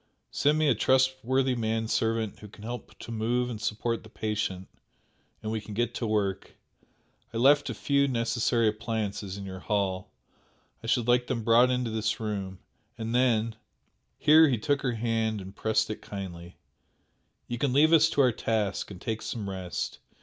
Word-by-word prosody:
Send 145 +2 +2
me 155 -1 +2
a 135 - +5
trustworthy 130 +2 +2
man 110 -1 -1
servant 110 -1 0
who 105 - -10
can 105 0 -14
help 120 +2 -7
to 115 - -9
move 120 +2 0
and 110 -2 -6
support 110 +2 -1
the 110 - -14
patient, 105 -4 -3 0.8
and 110 - -3
we 110 -1 -2
can 105 0 -9
get 120 +1 0
to 115 - -3
work. 100 -3 -1 0.8
I 115 - -4
left 140 +4 +5
a - - -3
few 140 0 +2
necessary 115 -1 +1
appliances 105 -2 -3
in 100 - -7
your 95 -1 -7
hall 95 -2 -1 0.7
I - - -6
should 120 0 +1
like 125 0 +3
them 115 -3 -2
brought 120 +3 +5
into 125 -2 0
this 110 -1 -1
room 100 -4 -4 0.4
and 115 0 -4
then 115 -3 +2 0.3
" - - -46
here 155 +1 +7
he 130 -4 +1
took 140 +6 0
her 125 -3 0
hand 115 -1 -1
and 95 +1 -9
pressed 110 0 +1
it 110 - -6
kindly 90 -3 -8 0.9
"you 120 -1 -4
can 140 0 +1
leave 155 +5 +5
us 160 0 +6
to 145 - +2
our 130 -2 +5
task, 110 -3 -1
and 95 -3 -9
take 110 +2 -3
some 110 -4 -4
rest. 95 -2 -4
115 Hz, 180 wpm, -28 LUFS, 105-125 Hz, 0.9 s, here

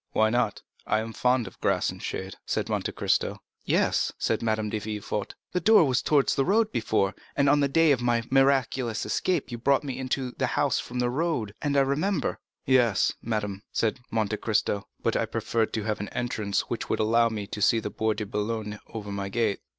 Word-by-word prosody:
"Why 110 0 +3
not? 120 -4 0 0.2
I 110 - +2
am 110 +1 -5
fond 125 0 +2
of 95 - -12
grass - - +1
and - - -11
shade," - - -4
said - - -2
Monte - - -1
Cristo. - - 0 0.3
"Yes," - - +2
said 110 - 0
Madame 110 -2 0
de 110 - -1
Villefort, 105 -1 -4 0.2
"the 180 - 0
door 215 +1 +6
was 130 -2 +1
towards 145 -3 +3
the 135 - +2
road 215 +6 +2
before, 110 -4 +1 0.2
and 140 -1 +3
on 145 +1 +5
the 140 - +3
day 160 +2 +4
of 130 -3 +2
my 120 -1 +1
miraculous 135 -3 +2
escape 145 - 0
you 120 - -5
brought 140 +4 +2
me 135 -3 -4
into 130 -1 -2
the - - +2
house - - +2
from 125 - -6
the 125 0 +1
road, 140 -8 -1
I - - -1
remember." 140 +7 +1 0.3
"Yes, 120 -7 +3
madame," 105 -3 -3
said 115 +2 0
Monte 110 -2 0
Cristo; 105 -2 0 0.2
"but - - +1
I - - +1
preferred 115 -1 -1
having 105 -2 -2
an - - -12
entrance 105 -5 -1
which - - -5
would - - 0
allow 115 +2 +3
me 105 -2 -4
to 105 +1 -6
see 115 - +4
the 105 - -5
Bois 110 +2 0
de 105 0 -4
Boulogne 105 0 -3
over 105 -3 -7
my 100 0 -3
gate." 110 -1 0
115 Hz, 205 wpm, -27 LUFS, 105-135 Hz, 0.3 s, door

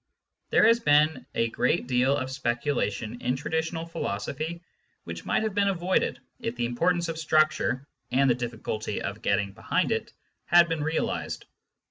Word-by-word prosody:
There - - +5
has 230 +1 +6
been 150 - +3
a 115 - +1
great 125 +6 +1
deal 130 +2 +2
of 130 -1 -3
speculation 120 -3 -2
in 125 +1 0
traditional 160 +3 -2
philosophy 160 - -4 0.4
which - - -7
might - - +1
have 215 -2 -1
been 200 0 +2
avoided 185 -1 +1 0.2
if 115 - -3
the 120 0 -1
importance 170 +8 +1
of 165 -1 -4
structure, 155 -4 +2 0.2
and 135 +2 +3
the 125 - +5
difficulty 110 -3 -4
of 100 +2 -5
getting 100 -1 +1
behind - - 0
it, - - -1 0.3
had 175 0 +6
been 165 -3 -1
realised. 160 +2 -2
140 Hz, 155 wpm, -27 LUFS, 120-165 Hz, 0.4 s, has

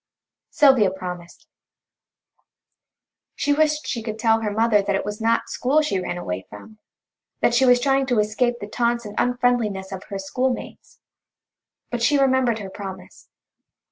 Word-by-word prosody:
Sylvia 265 -9 +5
promised. 180 -2 -8 1.9
She 290 - +1
wished 305 0 +1
she 235 - -3
could 220 -1 -5
tell 225 0 +2
her 215 - -1
mother 215 0 +2
that 200 0 -1
it 195 - -2
was 210 +1 -5
not 230 +1 +1
school 290 +5 +1
she 245 -11 -1
ran 180 -1 -4
away 95 - -5
from; 215 - -13 0.6
that - - +3
she 250 +2 +4
was 245 0 +6
trying 270 +1 +1
to 245 -3 +1
escape 215 +4 +1
the 205 - -7
taunts 235 +1 -1
and 205 - -7
unfriendliness 245 -6 0
of 190 -1 -7
her 200 - -6
schoolmates. 250 +7 -4 0.9
But 240 -1 -3
she 290 +5 +3
remembered 260 -4 +2
her 200 -3 -7
promise. 190 -1 -10
225 Hz, 155 wpm, -22 LUFS, 200-250 Hz, 1.9 s, was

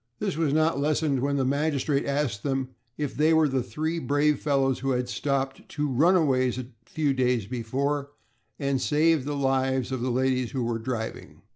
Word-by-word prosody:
This - - -2
was 160 -3 +1
not 155 0 +2
lessened 150 -1 +1
when 140 +1 0
the 135 - +1
magistrate 140 0 0
asked 140 -7 -1
them 135 0 -1 0.3
if 145 -2 -2
they 155 +2 +4
were 160 -1 +4
the 135 -2 0
three 160 +6 -3
brave 145 -1 +1
fellows 135 -3 +1
who 135 - -2
had 125 0 -1
stopped 135 +1 -1
the - - -17
two 150 -1 -2
runaways 135 -3 +3
a 130 - -4 0.2
few 150 -3 0
days 125 -4 +1
before, 135 +5 -2 0.5
and 140 -3 -1
saved 155 -1 +2
the 145 -1 -2
lives 130 -1 0
of 130 -2 -2
the 130 - -1
ladies 130 -1 0
who 130 -3 -1
were 115 -1 -1
driving. 110 -1 -5
135 Hz, 185 wpm, -26 LUFS, 130-150 Hz, 0.5 s, they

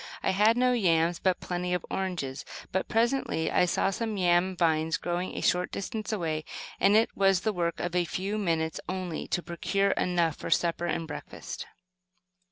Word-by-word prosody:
I - - +2
had 210 +4 +4
no 250 0 +3
yams, 170 -6 +2
but 185 -2 +1
plenty 180 0 -2
of 180 - -4
oranges; 175 -8 -3 0.3
but 190 - -1
presently 230 -8 +1
I - - +4
saw 195 +2 +1
some 220 0 -3
yam 180 0 +2
vines 160 -2 +2
growing 175 +1 -3
a - - -2
short 180 0 +1
distance 215 +2 -4
away, 160 -7 -1 0.4
and 200 +1 +5
it 225 +1 +3
was 195 -2 +3
the 220 +1 0
work 170 -2 -1
of 175 -1 -2
a 175 -1 +3
few 195 +5 -2
minutes 160 -5 0
only 185 -3 -3
to 175 - -1
procure 195 +4 0
enough 170 -5 +1
for - - -6
supper 170 0 +1
and 165 -1 -2
breakfast. 150 - -7
180 Hz, 175 wpm, -28 LUFS, 170-195 Hz, 0.4 s, and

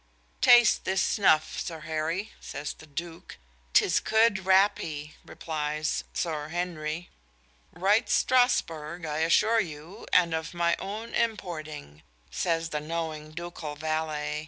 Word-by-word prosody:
"Taste 240 -2 +6
this 190 0 0
snuff, 175 -6 +2
Sir 165 -2 -5
Harry," 160 +6 -2
says 145 +1 -5
the 160 - -15
"Duke." 165 +3 -7 0.4
"'Tis - - +4
good 220 -4 +2
rappee," 165 -6 +2
replies 155 -1 -3
"Sir 155 -3 -2
Harry." 170 -1 -4 0.6
"Right 200 +5 +2
Strasburgh, 170 -10 +1
I 150 0 -2
assure 215 +8 +4
you, 165 -1 -6
and 170 -2 +4
of 160 +2 -3
my 170 0 +2
own 215 +4 -6
importing," 155 - -3 0.3
says 165 -2 -1
the 150 - -2
knowing 155 -1 -4
ducal 160 -2 -7
valet. 155 -1 -2
165 Hz, 120 wpm, -28 LUFS, 155-190 Hz, 0.6 s, Taste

